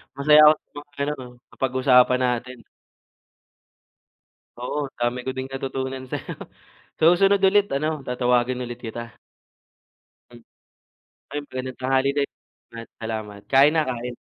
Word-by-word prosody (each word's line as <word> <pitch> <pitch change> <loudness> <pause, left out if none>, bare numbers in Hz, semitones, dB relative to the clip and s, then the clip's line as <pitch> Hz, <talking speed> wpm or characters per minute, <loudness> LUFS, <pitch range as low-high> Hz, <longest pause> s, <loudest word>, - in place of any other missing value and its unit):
Masaya 150 +2 +6
ako 150 - +8
sa - - -51
mga 145 0 -10
ano, 145 +1 0 0.4
napag-usapan 125 -1 +3
natin. 125 0 -2 2.0
Oo, 135 +3 -3
dami 120 +1 -1
ko 130 - -5
ding 130 - -3
natutunan 130 -1 -4
sa'yo. - - -5 0.6
Sa 165 +2 +6
susunod 195 +3 +4
ulit 205 +1 +3
ano, 155 +2 -2
tatawagin 125 0 0
ulit 120 0 -8
kita. 115 0 -8 1.1
Hmm, 120 -1 -15 0.9
ay - - -1
magandang 130 -2 -7
tanghali 130 +1 +2
din 140 -1 0 0.5
at 115 - -8 0.2
salamat. 110 -2 -5
Kain 140 +2 +6
na 160 - +3
kain. 125 0 -4
130 Hz, 125 wpm, -23 LUFS, 125-140 Hz, 2.0 s, ako